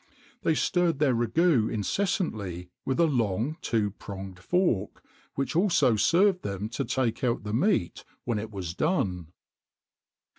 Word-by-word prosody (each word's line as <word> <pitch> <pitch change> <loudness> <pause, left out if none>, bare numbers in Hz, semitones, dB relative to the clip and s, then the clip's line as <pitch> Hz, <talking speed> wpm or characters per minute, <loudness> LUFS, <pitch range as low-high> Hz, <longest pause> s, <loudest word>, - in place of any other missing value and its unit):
They 160 - +2
stirred 175 -2 +1
their 145 -3 +3
ragoût 120 +1 +2
incessantly 105 - -2
with 130 - -1
a 170 - +6
long 120 - 0
two 110 - 0
pronged 95 -2 -8
fork, 120 - 0 0.3
which 135 +3 -2
also 165 - +3
served 180 - +3
them 100 +1 -4
to 120 - -2
take 125 -1 -1
out 120 -2 0
the 105 0 -4
meat 150 - +1 0.2
when 115 -3 -1
it 110 +1 -5
was 95 -6 -5
done. 95 - -1
120 Hz, 140 wpm, -27 LUFS, 100-165 Hz, 0.3 s, a